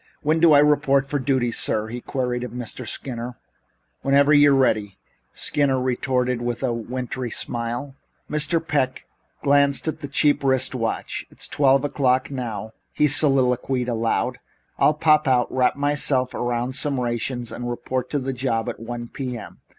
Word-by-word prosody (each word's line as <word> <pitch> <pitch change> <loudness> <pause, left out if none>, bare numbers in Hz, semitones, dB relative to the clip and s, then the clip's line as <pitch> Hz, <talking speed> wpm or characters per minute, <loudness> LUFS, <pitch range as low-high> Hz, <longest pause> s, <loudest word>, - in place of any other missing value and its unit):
"When 155 +2 +2
do 165 -1 +6
I - - +8
report 145 -2 +3
for 145 +1 -1
duty, 130 -3 0
sir?" 110 -1 -1
he 120 +1 -6
queried 125 -2 -2
of 125 - -4
Mr. 125 0 -5
Skinner. 120 -1 -3 0.6
"Whenever 140 +2 +4
you're 145 -1 +6
ready," 110 -7 +1 0.3
Skinner 140 -3 +1
retorted 125 -1 0
with 120 +1 -3
a 125 -3 +1
wintry 125 +2 -4
smile. 120 +4 -3 0.3
Mr. 155 +2 +1
Peck 130 -3 -1 0.4
glanced 140 +1 +3
at 155 - -3
a - - -3
cheap 145 +1 +2
wrist 130 -1 +1
watch. 115 -3 -3
"It's - - -7
twelve 135 -1 +3
o'clock 130 -2 +1
now," 110 -5 -5 0.2
he 150 - +2
soliloquized 130 -3 +2
aloud. 115 -1 -1 0.4
"I'll 150 - +4
pop 155 -1 +3
out, 125 -2 +2
wrap 125 -1 +2
myself 140 -2 +1
around 120 +1 -2
some 140 -2 0
rations 120 0 -3
and 120 0 -5
report 125 +3 -3
on 140 - 0
the 135 0 -2
job 120 -3 -1
at - - -6
one 120 +1 -6
P.M. 125 -3 -7
130 Hz, 160 wpm, -23 LUFS, 120-140 Hz, 0.6 s, I